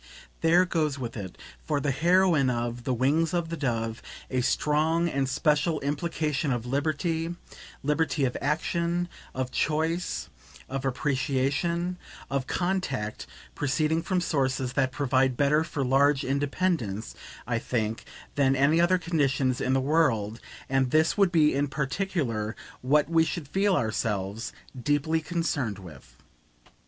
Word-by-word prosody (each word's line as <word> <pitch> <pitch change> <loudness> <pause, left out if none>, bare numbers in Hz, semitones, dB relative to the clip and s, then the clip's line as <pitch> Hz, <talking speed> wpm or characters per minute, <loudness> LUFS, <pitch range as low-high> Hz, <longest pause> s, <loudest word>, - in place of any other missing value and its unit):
There 170 +3 +4
goes 155 -5 0
with 120 -4 -5
it, 95 -5 -7 0.3
for 150 -2 0
the 140 0 0
heroine 170 -1 +3
of 120 0 -3
"The 130 - +1
Wings 155 +7 +2
of 170 -2 -1
the 165 - -3
Dove," 115 -6 -2 0.3
a 130 -1 +1
strong 155 +6 +2
and 135 -4 -1
special 150 +3 +1
implication 150 0 -1
of 120 -2 -2
liberty, 160 +5 -1 0.5
liberty 150 0 +1
of 125 - -2
action, 170 +4 0 0.3
of 130 -1 -2
choice, 160 +3 -1 0.4
of 135 0 -4
appreciation, 140 +7 0 0.3
of 135 -1 -1
contact 175 - -2 0.3
proceeding 155 +3 0
from 180 +1 0
sources 135 -6 0
that 130 -1 +1
provide 130 -3 +1
better 150 +2 +3
for 155 -4 -3
large 135 +2 +3
independence, 140 - -1 0.3
I 120 -2 0
think, 115 0 -2 0.3
than 135 -1 +3
any 145 +5 +4
other 180 +2 +4
conditions 140 -7 0
in 130 - +1
the 135 - +3
world 125 -7 +1 0.3
and 135 -1 +1
this 155 +4 +3
would 195 -3 +3
be 155 -3 +4
in 140 +1 +1
particular 140 - -2 0.3
what 145 +4 +3
we 165 0 +4
should 160 -2 -4
feel 195 +5 +2
ourselves 110 - -1 0.3
deeply 145 +4 +1
concerned 150 - -1
with. 80 -10 -13
145 Hz, 135 wpm, -27 LUFS, 130-165 Hz, 0.5 s, There